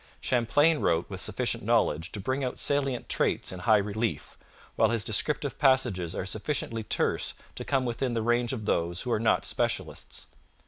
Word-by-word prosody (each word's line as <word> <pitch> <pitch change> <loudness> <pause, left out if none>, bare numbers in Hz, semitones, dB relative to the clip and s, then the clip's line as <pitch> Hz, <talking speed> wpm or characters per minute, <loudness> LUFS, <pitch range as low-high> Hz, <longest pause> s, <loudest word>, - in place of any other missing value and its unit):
Champlain 145 +6 +3
wrote 80 0 +1
with - - -4
sufficient - - -1
knowledge 80 +4 +1
to 105 - -4
bring 130 +7 -1
out 125 - -3
salient 140 -3 0
traits - - 0
in 95 - -7
high 105 +4 +4
relief, 105 +3 -2 0.4
while - - +4
his 115 -3 +1
descriptive 140 +7 -1
passages 120 - +2
are - - -3
sufficiently 115 +2 -2
terse 105 - -1 0.2
to - - -6
come 135 -2 0
within 120 +1 -1
the 115 - 0
range 120 +1 +1
of 115 -5 -4
those 85 -3 0
who 125 - -3
are 110 - +2
not 110 - +2
specialists. - - -2
115 Hz, 175 wpm, -28 LUFS, 100-130 Hz, 0.4 s, high